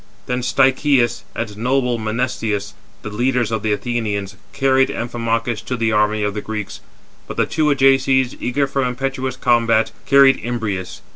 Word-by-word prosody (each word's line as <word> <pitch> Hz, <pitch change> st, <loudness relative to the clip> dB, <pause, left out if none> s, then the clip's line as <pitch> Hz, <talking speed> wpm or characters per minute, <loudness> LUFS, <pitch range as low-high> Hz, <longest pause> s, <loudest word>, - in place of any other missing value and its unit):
Then 125 Hz, 0 st, -2 dB
Stichius 130 Hz, -2 st, +2 dB
and 110 Hz, -2 st, -4 dB
noble 125 Hz, +1 st, 0 dB
Menestheus, 110 Hz, -2 st, -2 dB, 0.3 s
the 105 Hz, -, -6 dB
leaders 120 Hz, +1 st, 0 dB
of 110 Hz, -1 st, -1 dB
the 110 Hz, 0 st, -1 dB
Athenians, 105 Hz, -3 st, -2 dB, 0.2 s
carried 135 Hz, -1 st, +2 dB
Amphimachus 115 Hz, -1 st, -2 dB
to 125 Hz, -, -3 dB
the 115 Hz, -1 st, 0 dB
army 105 Hz, 0 st, +1 dB
of 105 Hz, 0 st, -1 dB
the 105 Hz, -, -4 dB
Greeks, 105 Hz, -2 st, -6 dB, 0.5 s
but -, -, -7 dB
the -, -, +3 dB
two 155 Hz, -1 st, -1 dB
Ajaces, 135 Hz, -2 st, +3 dB
eager 140 Hz, +3 st, 0 dB
for 135 Hz, 0 st, -1 dB
impetuous 130 Hz, +1 st, -2 dB
combat, 115 Hz, -3 st, +2 dB, 0.2 s
[carried] 135 Hz, -1 st, +6 dB
Imbrius. 110 Hz, -6 st, -4 dB
120 Hz, 150 wpm, -19 LUFS, 110-130 Hz, 0.5 s, carried